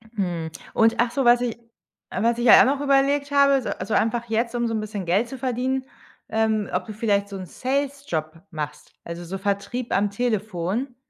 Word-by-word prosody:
Hm. 175 Hz, -5 st, -2 dB, 0.2 s
Und 225 Hz, 0 st, +4 dB
ach 240 Hz, 0 st, +2 dB
so, 270 Hz, -1 st, 0 dB
was 240 Hz, 0 st, +6 dB
ich 235 Hz, -2 st, -2 dB, 0.5 s
was 230 Hz, +4 st, +1 dB
ich 240 Hz, -, -1 dB
ja -, -, +9 dB
auch -, -, +6 dB
noch 275 Hz, +2 st, 0 dB
überlegt 280 Hz, +1 st, +2 dB
habe, 280 Hz, -1 st, +4 dB
so -, -, -4 dB
also, 220 Hz, -, -4 dB
einfach 235 Hz, +1 st, +1 dB
jetzt, 230 Hz, +2 st, 0 dB
um 240 Hz, 0 st, 0 dB
so 225 Hz, -, -2 dB
'n 220 Hz, -, 0 dB
bisschen 210 Hz, -3 st, -5 dB
Geld 195 Hz, +7 st, +2 dB
zu 265 Hz, +2 st, -7 dB
verdienen, 260 Hz, +1 st, -1 dB, 0.5 s
ähm, 220 Hz, -1 st, 0 dB
ob -, -, -1 dB
du 215 Hz, -, -7 dB
vielleicht 205 Hz, -2 st, 0 dB
so 200 Hz, -, -7 dB
'n 185 Hz, -, -6 dB
Salesjob 260 Hz, -, -3 dB
machst. 150 Hz, -2 st, -6 dB
Also, 170 Hz, +1 st, -7 dB
so 190 Hz, +3 st, -5 dB
Vertrieb 200 Hz, +5 st, -3 dB
am 205 Hz, +1 st, +1 dB
Telefon. 215 Hz, +1 st, -2 dB
225 Hz, 200 wpm, -24 LUFS, 200-255 Hz, 0.5 s, ja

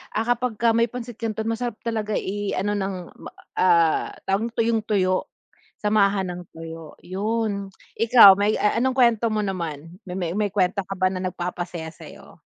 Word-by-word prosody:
ah, 225 Hz, -, 0 dB
kapagka 235 Hz, -1 st, +1 dB
may 230 Hz, +1 st, +3 dB
pancit 240 Hz, -1 st, -8 dB
canton 220 Hz, -1 st, -3 dB
masarap 235 Hz, 0 st, -3 dB
talaga 215 Hz, -2 st, -2 dB
i-ano 205 Hz, 0 st, -2 dB
ng 195 Hz, -1 st, -2 dB, 0.2 s
m -, -, -12 dB, 0.3 s
ah, 170 Hz, -3 st, +3 dB, 0.2 s
tawag 200 Hz, +4 st, 0 dB
tuyong-tuyo, 215 Hz, -5 st, +1 dB, 0.6 s
samahan 200 Hz, -2 st, +2 dB
ng 180 Hz, 0 st, -7 dB
tuyo, 165 Hz, -1 st, -9 dB
yun. 200 Hz, +1 st, -2 dB, 0.3 s
Ikaw 225 Hz, -3 st, +9 dB
may 210 Hz, +1 st, +2 dB
a 210 Hz, -, +1 dB
anong 260 Hz, 0 st, +1 dB
kwento 235 Hz, -2 st, +4 dB
mo 215 Hz, 0 st, 0 dB
naman? 170 Hz, -2 st, -5 dB
Me 180 Hz, -2 st, -3 dB
may 210 Hz, 0 st, 0 dB
kwento 195 Hz, 0 st, +1 dB
ka 195 Hz, -, -4 dB
ba 185 Hz, 0 st, +3 dB
na 185 Hz, -1 st, -4 dB
nag-papasaya 175 Hz, -2 st, -4 dB
sa'yo? -, -, -14 dB
205 Hz, 155 wpm, -23 LUFS, 185-225 Hz, 0.6 s, Ikaw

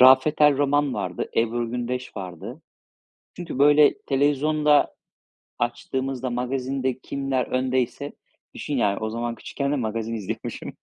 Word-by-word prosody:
Rafet 130 Hz, +4 st, +7 dB
El 150 Hz, -2 st, +6 dB
Roman 145 Hz, -1 st, +2 dB
vardı, -, -, -3 dB
Ebru 115 Hz, 0 st, +1 dB
Gündeş 125 Hz, +1 st, -4 dB
vardı. 90 Hz, -4 st, -7 dB, 0.7 s
Çünkü, 170 Hz, -6 st, -6 dB
böyle, 145 Hz, +1 st, +6 dB
televizyonda 145 Hz, +2 st, +2 dB, 0.6 s
açtığımızda, 130 Hz, +2 st, -2 dB
magazinde 130 Hz, +1 st, -2 dB
kimler 135 Hz, -3 st, -1 dB
öndeyse 130 Hz, +2 st, -1 dB, 0.4 s
Düşün 145 Hz, -, -3 dB
yani 100 Hz, -4 st, +2 dB
o 110 Hz, 0 st, -2 dB
zaman 115 Hz, +1 st, -3 dB
küçükken 140 Hz, 0 st, -3 dB
de -, -, +2 dB
magazin 115 Hz, -2 st, -2 dB
izliyormuşum. 105 Hz, -4 st, -5 dB
130 Hz, 120 wpm, -24 LUFS, 120-140 Hz, 0.7 s, Rafet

